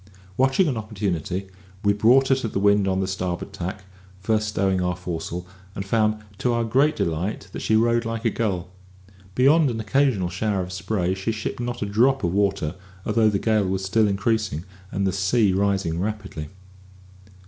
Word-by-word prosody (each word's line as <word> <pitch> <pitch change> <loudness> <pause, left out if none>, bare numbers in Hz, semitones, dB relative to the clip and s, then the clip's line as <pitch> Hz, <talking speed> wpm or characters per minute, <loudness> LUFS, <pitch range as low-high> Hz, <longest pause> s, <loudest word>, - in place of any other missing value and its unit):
Watching 135 - +3
an 130 -6 -1
opportunity, 100 -4 -3 0.4
we 100 0 +4
brought 125 +6 +4
her 135 - +5
to 130 - -2
the 105 - -4
wind 100 0 +3
on 95 0 +1
the 95 - -1
starboard 90 -2 -3
tack, 95 +2 -5 0.4
first 110 +2 0
stowing 95 -3 +1
our 90 0 0
foresail, 90 0 -5 0.3
and 95 - -4
found, 110 0 +1 0.2
to 125 - +1
our 120 0 +1
great 135 +7 +2
delight, 85 +6 -2
that - - -6
she 110 - +1
rode 115 +1 +3
like 115 0 -4
a 115 - +3
gull. 95 -6 -2 0.6
Beyond 140 +4 +5
an 115 -2 -3
occasional 110 -4 +1
shower 95 +1 -1
of 90 +1 -7
spray, 95 -1 -1
she 95 +4 -2
shipped 110 +2 -4
not 120 -1 -3
a - - -1
drop 120 +6 +2
of 85 0 0
water, 100 -5 +1 0.3
although 110 0 +3
the 100 - +1
gale 110 -1 +1
was 95 0 -1
still 105 +3 +3
increasing, 100 -4 0 0.3
and 100 0 -1
the 95 - +1
sea 95 +2 +2
rising 95 -4 0
rapidly. 100 -5 -4
100 Hz, 180 wpm, -24 LUFS, 95-115 Hz, 0.6 s, her